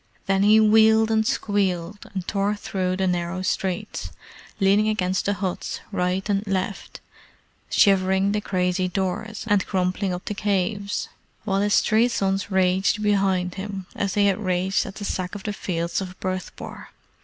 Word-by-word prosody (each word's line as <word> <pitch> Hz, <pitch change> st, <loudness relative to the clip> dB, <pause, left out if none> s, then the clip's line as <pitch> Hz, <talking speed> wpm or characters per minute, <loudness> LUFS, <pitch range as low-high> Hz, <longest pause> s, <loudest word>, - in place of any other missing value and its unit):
Then 195 Hz, 0 st, +2 dB
he 210 Hz, +2 st, +6 dB
wheeled 220 Hz, +1 st, +5 dB
and 220 Hz, 0 st, +2 dB
squealed, 195 Hz, -2 st, -1 dB
and 190 Hz, -3 st, -5 dB
tore 200 Hz, +1 st, 0 dB
through 185 Hz, -2 st, -2 dB
the 190 Hz, -, +1 dB
narrow 180 Hz, 0 st, -1 dB
streets, 190 Hz, +2 st, -2 dB, 0.5 s
leaning 200 Hz, +2 st, +4 dB
against 190 Hz, -3 st, 0 dB
the 205 Hz, -, +2 dB
huts 190 Hz, -2 st, -3 dB
right 185 Hz, 0 st, -1 dB
and 200 Hz, -1 st, +1 dB
left, 195 Hz, 0 st, -3 dB, 0.7 s
shivering 190 Hz, 0 st, +3 dB
the 210 Hz, 0 st, 0 dB
crazy 185 Hz, -1 st, 0 dB
doors, 195 Hz, +5 st, -3 dB
and 205 Hz, -3 st, +2 dB
crumpling 185 Hz, 0 st, 0 dB
up 180 Hz, 0 st, -5 dB
the -, -, -2 dB
caves; 200 Hz, 0 st, -1 dB, 0.4 s
while 195 Hz, -2 st, 0 dB
his 205 Hz, 0 st, +3 dB
three 220 Hz, +3 st, +3 dB
sons 195 Hz, -5 st, -1 dB
raged 190 Hz, +2 st, +2 dB
behind 195 Hz, -1 st, 0 dB
as 200 Hz, -2 st, -2 dB
they 205 Hz, -1 st, +4 dB
had 195 Hz, -1 st, +2 dB
raged 185 Hz, +1 st, 0 dB
at 195 Hz, -, -8 dB
the 205 Hz, -, -6 dB
Sack 185 Hz, 0 st, -3 dB
of 200 Hz, -, -7 dB
the 210 Hz, -, -3 dB
Fields 170 Hz, -2 st, -2 dB
of 185 Hz, -1 st, -7 dB
Bhurtpore. 185 Hz, -1 st, -5 dB
195 Hz, 155 wpm, -24 LUFS, 185-205 Hz, 0.7 s, he